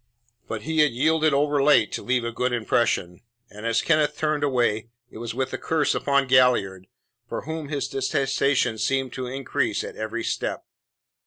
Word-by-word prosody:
But 110 -2 -5
he 160 +3 -1
had 150 -1 +6
yielded 155 +4 +2
overlate 145 -4 +3
to - - -4
leave 125 -1 0
a 115 - -2
good 125 +2 -1
impression 110 -6 0 0.3
and, 105 +3 -6
as 115 0 +1
Kenneth 155 -2 +2
turned 155 -1 0
away, 120 -5 0 0.2
it - - -10
was 115 0 -5
with 130 0 -2
a - - -3
curse 160 -2 +1
upon 140 -1 +1
Galliard, 120 -8 +3 0.4
for - - -3
whom 160 -1 -5
his 145 -3 -2
detestation 135 -3 0
seemed 135 0 0
to 130 -1 -4
increase 135 +1 -2
at - - -8
every 110 +2 -4
step. - - -3
130 Hz, 170 wpm, -24 LUFS, 115-145 Hz, 0.4 s, had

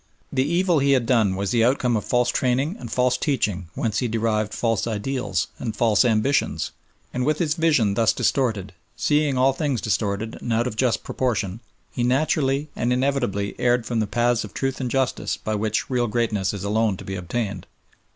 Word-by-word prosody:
The 130 - +2
evil 170 +2 +2
he 140 0 +3
had 130 -3 +2
done 110 -6 +2
was 100 0 -2
the 115 -2 +3
outcome 125 0 +2
of 105 - -1
false 125 0 +1
training 130 +9 0
and - - -8
false 125 0 +2
teaching 105 - -1
whence 110 -2 -1
he 125 - 0
derived 110 -2 0
false 115 -1 0
ideals 105 -4 -1
and 110 -4 -4
false 110 -1 +3
ambitions, 125 +4 +1 0.4
and 125 - -1
with 150 +3 +1
his 160 -4 +1
vision 150 - +2
thus 115 +1 +3
disturbed, 110 -6 0 0.2
seeing 150 -3 +2
all 130 +1 +4
things 140 -3 -1
distorted 105 +1 -2
and 120 - -4
out 115 +1 +2
of 125 - -3
just 125 0 +1
proportion, 110 -5 -2 0.3
he - - -4
naturally 135 +2 +1
and 120 +1 0
inevitably 125 -6 0
erred 120 -1 +2
from 120 -2 -1
the 110 - 0
paths 120 +2 +1
of 105 - -10
truth 135 0 -2
and 125 - -2
justice 130 0 -1
by 110 - -3
which 110 +1 -1
real 125 -2 0
greatness 105 -4 0
is 100 -3 -6
alone 105 -1 +1
to - - -10
be 95 - -5
attained. 100 +1 -4
120 Hz, 190 wpm, -23 LUFS, 105-130 Hz, 0.4 s, all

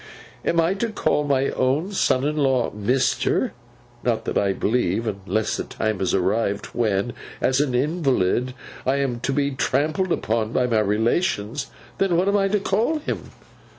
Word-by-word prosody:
Am 170 - +1
I 165 +3 +3
to 225 +4 -2
call 150 -8 0
my 140 -1 +2
own 140 +9 0
son 135 -9 +2
in 150 +1 0
law, 135 -4 +2
Mister! 115 +6 +1 0.5
Not, - - 0
I 100 -1 +2
believe, 110 0 0
unless 105 +1 -1
the - - -2
time 110 -3 -2
has 95 - +1
arrived 100 +2 0
when, 110 0 0 0.3
as 130 +2 +2
an 135 -4 0
invalid, 130 - +1 0.3
I 130 - +1
am 135 -4 -1
to 130 - -1
be 140 +1 +1
trampled 150 +7 0
upon 110 -4 0
by 125 - +2
my 115 -3 +2
relations. 110 - 0 0.3
Then, 190 -3 +2
what 185 +3 +2
am 200 +1 +3
I 195 -1 +2
to 205 +1 +1
call 220 +11 +1
him! 300 - -5
130 Hz, 165 wpm, -23 LUFS, 110-155 Hz, 0.5 s, I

